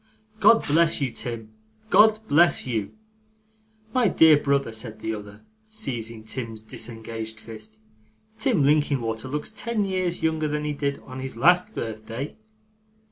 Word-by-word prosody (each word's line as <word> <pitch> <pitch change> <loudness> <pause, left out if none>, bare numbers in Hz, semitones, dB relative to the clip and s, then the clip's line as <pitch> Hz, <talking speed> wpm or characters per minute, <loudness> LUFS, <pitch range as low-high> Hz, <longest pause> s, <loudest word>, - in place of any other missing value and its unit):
God 225 +2 +5
bless 165 +3 +3
you, 135 -4 -1
Tim! 115 -3 -6 0.4
God 215 +1 +6
bless 170 +4 +4
you!' 110 -6 -3 1.0
'My 250 -3 +3
dear 160 -4 +6
brother,' 140 -3 +1
said 110 -1 -5
the 110 - -3
other, 105 0 -9 0.3
seizing 115 - -5
Tim's 110 -1 -6
disengaged 110 0 -6
fist, 110 -1 -11 0.6
'Tim 220 - +2
Linkinwater 135 -5 +1
looks 150 +3 -4
ten 230 -3 -1
years 185 -3 -1
younger 160 -1 +1
than 150 0 -2
he 150 - -1
did 140 -1 -2
on 130 0 -9
his 130 -3 -6
last 180 - +3
birthday. 115 +4 -5
135 Hz, 135 wpm, -25 LUFS, 110-165 Hz, 1.0 s, God